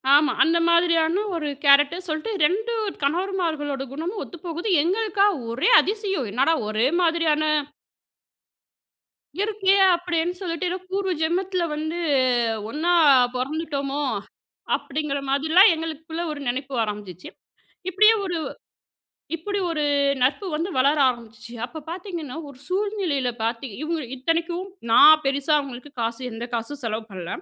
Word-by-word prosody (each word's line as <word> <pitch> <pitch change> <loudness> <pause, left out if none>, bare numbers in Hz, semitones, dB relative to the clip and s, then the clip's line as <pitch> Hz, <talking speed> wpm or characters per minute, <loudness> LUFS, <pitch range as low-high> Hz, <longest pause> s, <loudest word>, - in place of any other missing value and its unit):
ஆமா. 300 +1 +4
அந்த 330 +1 +2
மாதிரியான 335 +2 +3
ஒரு 310 -3 -3 0.2
கேரக்டர் 290 +6 +4
சொல்ட்டு 310 +7 -3
2 415 +10 +1 0.3
கணவர்மார்களோட 315 -4 -1
குணமும் 345 +8 -4
ஒத்து 345 - -11
போகுது. 345 +5 -3
எங்களுக்கா 400 +2 +1 0.3
ஒரே 250 +4 +1
அதிசயம் 390 - -2
என்னடா 270 +9 +2
ஒரே 215 +4 +1
மாதிரியான 325 -2 +2 2.0
இருக்கே 405 -2 +2 0.2
அப்டின்னு 345 0 -2
சொல்லிட்டு 355 0 -3
ஏதோ 365 - -2
பூர்வ 385 -1 -1
ஜென்மத்தில 360 +3 0
வந்து 315 +2 -4 0.7
ஒண்ணா 315 +7 -1 0.4
பொறந்துட்டோமோ 280 +1 -3 0.8
அப்டிங்கிற 285 -1 -3
மாதிரிலாம் 315 +9 +5
எங்களுக்குள்ள 320 +1 -5
ஒரு 300 - -6
நினைப்பு 265 +3 -3
ஆரம்பிச்சுச்சு. 205 -4 -7 0.6
இப்டியே 430 +5 +5
ஒரு 360 -3 -3 1.0
இப்டி 405 +5 -3
ஒரு 310 -3 -1 0.4
நட்பு 275 +10 +1
வந்து 330 +5 -2
வளர 280 +4 +3
ஆரம்பிச்சுச்சு 235 -1 -8
அப்ப 315 +5 -9
பார்த்தீங்கன்னா, 340 -6 -6
ஒரு 280 -2 -12
சூழ்நிலையில 370 - -1
பார்த்திங் 230 -1 -3
இவங்க 325 +1 -2 0.2
இத்தனைக்கும் 335 +7 -2 0.2
நான் 310 +6 +8
பெருசா 280 +2 +1
அவங்களுக்கு 275 0 -8
காசு 230 +2 -2
எந்த 225 +1 -6
காசும் 240 +5 -4
செலவு 220 -1 -3
பண்ல. 180 -3 -7
315 Hz, 120 wpm, -23 LUFS, 275-355 Hz, 2.0 s, நான்